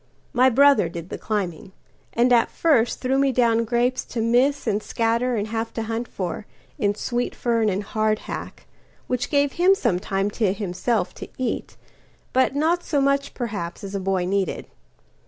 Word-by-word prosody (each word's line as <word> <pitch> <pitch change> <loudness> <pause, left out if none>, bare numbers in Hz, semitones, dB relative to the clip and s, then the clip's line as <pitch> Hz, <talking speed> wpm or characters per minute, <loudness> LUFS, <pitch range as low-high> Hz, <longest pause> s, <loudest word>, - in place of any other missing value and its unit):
My 255 0 +5
brother 275 -7 +5
did 170 +1 -7
the - - -5
climbing; 190 -2 -3 0.4
and 245 +1 +3
at 235 -1 +4
firstThrew 265 -2 +1
me 275 -1 +3
down 230 -2 +2
grapes 245 +2 +1
to 240 - -5
miss 250 +5 +2
and 215 -2 0
scatterAnd 230 0 0
have 225 0 -2
to 225 - -2
hunt 225 +2 -3
for 185 +2 -5 0.3
in 205 0 +1
sweet 240 +3 -2
fern 230 -3 +1
and 200 +1 -1
hardhack; 215 +1 -3 0.4
Which 250 -1 -2
gave 285 -1 +2
him 365 +5 +4
some 230 - 0
time 195 +2 -1
to 205 -3 +1
himself 195 +1 -1
to - - -8
eat, 255 - -3 0.6
But 260 +1 +2
not 330 +4 +1
so 290 - 0
much, 275 0 +1
perhaps, 205 -9 -4
as 195 0 -6
a 200 - -1
boy 190 -1 0
needed. 195 +1 -1
230 Hz, 165 wpm, -23 LUFS, 205-255 Hz, 0.6 s, My